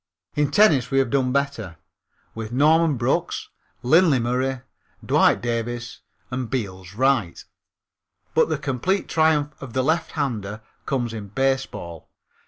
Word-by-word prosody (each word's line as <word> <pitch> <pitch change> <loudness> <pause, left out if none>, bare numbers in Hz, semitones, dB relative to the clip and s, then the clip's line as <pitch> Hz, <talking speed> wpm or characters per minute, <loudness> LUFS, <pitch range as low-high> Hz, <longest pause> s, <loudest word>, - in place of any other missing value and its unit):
In 150 -1 +1
tennis 145 - +4
we 135 - 0
have 135 -3 +2
done 130 -2 +1
better, 135 - -2 0.6
with 110 0 -6
Norman 155 +3 +3
Brookes, 120 +2 -1 0.3
Lindley 155 +3 +5
Murray, 125 +2 -1 0.4
Dwight - - +3
Davis 120 0 -3 0.3
and 125 -1 -3
Beals 95 -6 -4
Wright. 130 -7 +1 0.9
But - - +3
the 155 - 0
complete 145 +8 -1
triumph 155 -2 +2
of 130 -4 -8
the 130 - +1
lefthander 135 -9 -2 0.3
comes 120 -5 -1
in 105 -3 -6
baseball. 105 - -2
130 Hz, 125 wpm, -23 LUFS, 115-145 Hz, 0.9 s, Lindley